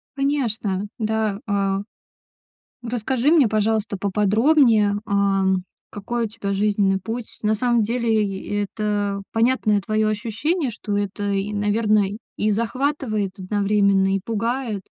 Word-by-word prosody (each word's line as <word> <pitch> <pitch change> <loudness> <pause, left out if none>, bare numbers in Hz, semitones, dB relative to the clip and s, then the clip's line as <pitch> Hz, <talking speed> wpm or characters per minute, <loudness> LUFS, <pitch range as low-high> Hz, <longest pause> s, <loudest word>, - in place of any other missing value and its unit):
Конечно, 225 -8 -1
да, 220 -3 -1
а, 195 -1 0 1.0
расскажи 245 +3 0
мне, 310 -7 +5
пожалуйста, 215 -1 0
поподробнее, 210 +3 +3
а, 200 -1 +1 0.5
какой 230 +3 -3
у - - -2
тебя 205 -2 -4
жизненный 200 -1 +1
путь. 225 +4 -6
На 215 0 +2
самом 240 +1 +2
деле 225 -1 +1
и 195 -1 -6
это 205 -1 -1
понятное 225 -3 +2
твоё 215 +2 0
ощущение, 235 - -1
что 210 -2 -4
это 205 0 -2
и, 195 +1 -1
наверное, 210 -1 +1 0.2
и 215 - +1
захватывает 230 -2 -1
одновременно, 200 0 +2
и - - 0
пугает, 230 0 -2
210 Hz, 120 wpm, -22 LUFS, 200-230 Hz, 1.0 s, мне